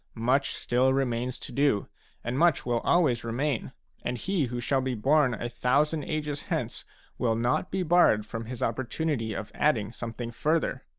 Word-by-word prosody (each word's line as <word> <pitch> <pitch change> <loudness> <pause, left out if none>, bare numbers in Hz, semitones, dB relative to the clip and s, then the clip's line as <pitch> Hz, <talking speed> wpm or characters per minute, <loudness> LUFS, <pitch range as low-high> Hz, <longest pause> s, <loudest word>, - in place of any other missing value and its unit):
Much 130 +5 +1
still 125 +2 +2
remains 125 -1 0
to - - -9
do, 140 -8 +2 0.4
and 120 +3 -2
much 170 -3 +3
will 120 -1 +1
always 135 -6 +2
remain, 125 +3 -1 0.3
and 125 - -2
he 185 - 0
who 120 0 -4
shall 130 +2 +1
be 130 -1 -2
born 135 +2 +3
a 120 - -4
thousand 145 +6 +1
ages 150 -2 -2
hence - - -3 0.3
will 115 -2 +2
not 120 +9 0
be 190 0 -1
barred 160 -11 +4
from 115 +1 -5
his 120 +1 -5
opportunity 120 -1 -1
of 105 - -5
adding 110 -9 +1
something 120 0 -5
further. 150 0 0
125 Hz, 170 wpm, -28 LUFS, 115-150 Hz, 0.4 s, barred